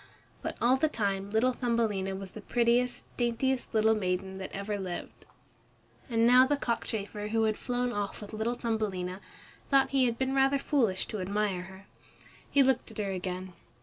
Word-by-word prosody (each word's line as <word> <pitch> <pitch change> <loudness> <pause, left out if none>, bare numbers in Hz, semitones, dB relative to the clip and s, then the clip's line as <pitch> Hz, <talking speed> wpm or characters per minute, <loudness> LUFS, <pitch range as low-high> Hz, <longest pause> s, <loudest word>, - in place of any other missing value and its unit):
But - - -4
all 250 +2 +4
the 310 +3 +2
time 200 -6 -1
little 225 +4 +2
Thumbelina 220 -6 0
was 190 -1 -7
the 215 - -9
prettiest, 240 +3 +1
daintiest 245 +2 0
little 220 0 +4
maiden 190 -2 -2
that 190 - -6
ever 200 +1 -3
lived. 180 -2 -6 0.8
And 230 -1 +3
now 250 +2 +7
the 290 +1 +1
cockchafer 210 -4 -3
who 225 +1 +1
had 215 -1 +2
flown 245 +1 -1
off 205 -1 -3
with 210 0 -9
little 220 +3 -1
Thumbelina 200 -6 -2 0.5
thought 275 -1 +4
he 270 -2 +4
had 235 -1 0
been 265 0 0
rather 270 +1 +4
foolish 250 -9 +1
to 215 - -4
admire 200 -1 0
her. 190 +1 -13 0.6
He 280 - +5
looked 260 -1 +1
at - - -12
her 200 -2 -1
again. 185 0 -4
220 Hz, 175 wpm, -30 LUFS, 195-245 Hz, 0.8 s, now